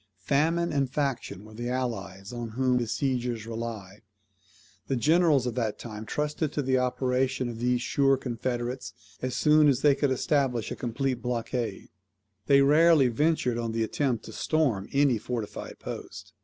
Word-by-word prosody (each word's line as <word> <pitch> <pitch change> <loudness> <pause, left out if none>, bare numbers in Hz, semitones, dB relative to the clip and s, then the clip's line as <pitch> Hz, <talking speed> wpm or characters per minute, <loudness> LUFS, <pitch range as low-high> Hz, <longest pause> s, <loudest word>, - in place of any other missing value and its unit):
Famine 165 +7 +1
and 140 -2 +1
faction 130 -8 -3
were 110 - -13
the 120 +2 -4
allies 105 -5 -4
on 120 -2 -5
whom 130 -1 +2
besiegers 120 -1 -1
relied. 110 -4 -6 0.9
The 135 - 0
generals 155 0 +3
of 125 - -1
that 115 -3 -2
time 110 -2 -8
trusted 150 0 -1
to 145 - -1
the 130 0 +2
operation 130 0 0
of 115 -2 -6
these 125 0 +1
sure 135 0 +3
confederates 125 0 -3 0.3
as 130 0 -2
soon 150 0 +5
as 140 -2 +2
they 145 -1 +6
could 145 0 +1
establish 130 -3 0
a - - -2
complete 125 +1 -2
blockade. 120 -2 -3 0.6
They 140 -1 +6
rarely 150 -1 +5
ventured 125 -2 +1
on 115 -1 -2
the 115 0 0
attempt 130 -2 -1
to - - -9
storm 135 -12 0
any 140 -5 +3
fortified 115 -1 -5
post. - - -8
125 Hz, 155 wpm, -27 LUFS, 115-140 Hz, 0.9 s, they